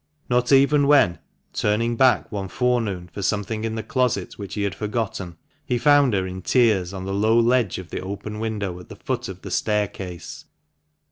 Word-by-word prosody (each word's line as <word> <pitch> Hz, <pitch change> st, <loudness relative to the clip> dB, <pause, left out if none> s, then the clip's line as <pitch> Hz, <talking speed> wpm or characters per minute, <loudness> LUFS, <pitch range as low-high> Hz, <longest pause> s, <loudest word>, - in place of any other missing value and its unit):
Not 125 Hz, +1 st, +2 dB
even 140 Hz, +1 st, +5 dB
when, 140 Hz, -12 st, +4 dB, 0.3 s
turning 115 Hz, +3 st, 0 dB
back 125 Hz, -3 st, +3 dB
one 100 Hz, -2 st, -3 dB
forenoon 110 Hz, -4 st, -1 dB
for 85 Hz, -, -7 dB
something 105 Hz, +2 st, -1 dB
in 110 Hz, 0 st, -2 dB
the 110 Hz, -, -4 dB
closet 125 Hz, +2 st, 0 dB
which 100 Hz, -2 st, -7 dB
he 105 Hz, -, -1 dB
had 100 Hz, -3 st, -1 dB
forgotten, 105 Hz, -3 st, -4 dB, 0.3 s
he 125 Hz, -, -1 dB
found 145 Hz, -3 st, +4 dB
her 95 Hz, -1 st, 0 dB
in 95 Hz, 0 st, -6 dB
tears 105 Hz, -5 st, +2 dB
on 95 Hz, -1 st, -6 dB
the 95 Hz, -, -3 dB
low 110 Hz, +3 st, +3 dB
ledge 120 Hz, -3 st, +2 dB
of 90 Hz, -3 st, -9 dB
the -, -, -4 dB
open 100 Hz, +3 st, -6 dB
window 105 Hz, -5 st, -3 dB
at 90 Hz, -, -14 dB
the -, -, -9 dB
foot -, -, -3 dB
of -, -, -9 dB
the -, -, -7 dB
staircase. 100 Hz, -4 st, -3 dB
105 Hz, 190 wpm, -23 LUFS, 95-120 Hz, 0.3 s, even